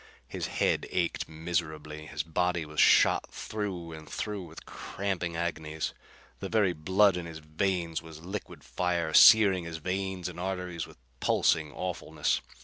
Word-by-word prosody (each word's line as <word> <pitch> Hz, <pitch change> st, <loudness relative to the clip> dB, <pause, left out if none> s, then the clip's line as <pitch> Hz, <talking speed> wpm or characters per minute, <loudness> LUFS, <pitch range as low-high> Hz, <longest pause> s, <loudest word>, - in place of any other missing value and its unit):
His -, -, -4 dB
head -, -, 0 dB
ached 85 Hz, -2 st, -1 dB
miserably; 80 Hz, -2 st, -3 dB
his 75 Hz, +1 st, -3 dB
body 85 Hz, +1 st, 0 dB
was 75 Hz, 0 st, -6 dB
shot -, -, +5 dB
through 95 Hz, -6 st, -4 dB
and 80 Hz, -1 st, -10 dB
through 105 Hz, -2 st, -3 dB
with 80 Hz, -2 st, -11 dB
cramping 90 Hz, -4 st, -4 dB
agonies. 80 Hz, -2 st, -3 dB, 0.5 s
The 95 Hz, -, -5 dB
very 105 Hz, -5 st, +3 dB
blood 95 Hz, +4 st, +3 dB
in 85 Hz, -1 st, -5 dB
his 80 Hz, -1 st, -8 dB
veins 85 Hz, +1 st, -1 dB
was 80 Hz, 0 st, -12 dB
liquid 95 Hz, +3 st, -6 dB
fire, 85 Hz, -3 st, -1 dB
searing 95 Hz, -5 st, +8 dB
his 85 Hz, -1 st, -5 dB
veins 95 Hz, +1 st, -3 dB
and 90 Hz, -1 st, -7 dB
arteries 90 Hz, -3 st, -3 dB
with -, -, -16 dB, 0.2 s
pulsing 75 Hz, -2 st, +2 dB
awfulness. 90 Hz, +1 st, -2 dB
85 Hz, 145 wpm, -29 LUFS, 80-95 Hz, 0.5 s, searing